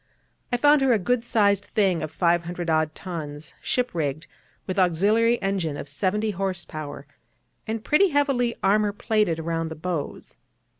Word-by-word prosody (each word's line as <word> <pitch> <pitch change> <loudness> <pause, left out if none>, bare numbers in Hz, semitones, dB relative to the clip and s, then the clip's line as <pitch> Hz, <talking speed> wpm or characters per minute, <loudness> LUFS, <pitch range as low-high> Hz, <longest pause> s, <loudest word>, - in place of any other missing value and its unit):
I 245 - +2
found 290 +3 +5
her 265 -2 +4
a - - +4
good 230 +5 0
sized 200 -4 +2
thing 190 -6 +1
of 155 - -3
500 170 0 0
odd 155 -1 +1
tons, 150 -6 -7
ship 250 0 0
rigged, 155 -2 -2 0.4
with 185 0 -2
auxiliary 210 +7 +3
engine 185 -7 -1
of - - -7
seventy 205 +9 -1
horse 190 -2 -3
power, 145 -2 -7 0.6
and 220 0 -3
pretty 380 +7 +4
heavily 275 -5 +1
armour 205 +1 +3
plated 210 -5 +1
round 165 0 -2
the 160 - -6
bows. 160 -2 -5
185 Hz, 155 wpm, -25 LUFS, 160-220 Hz, 0.6 s, found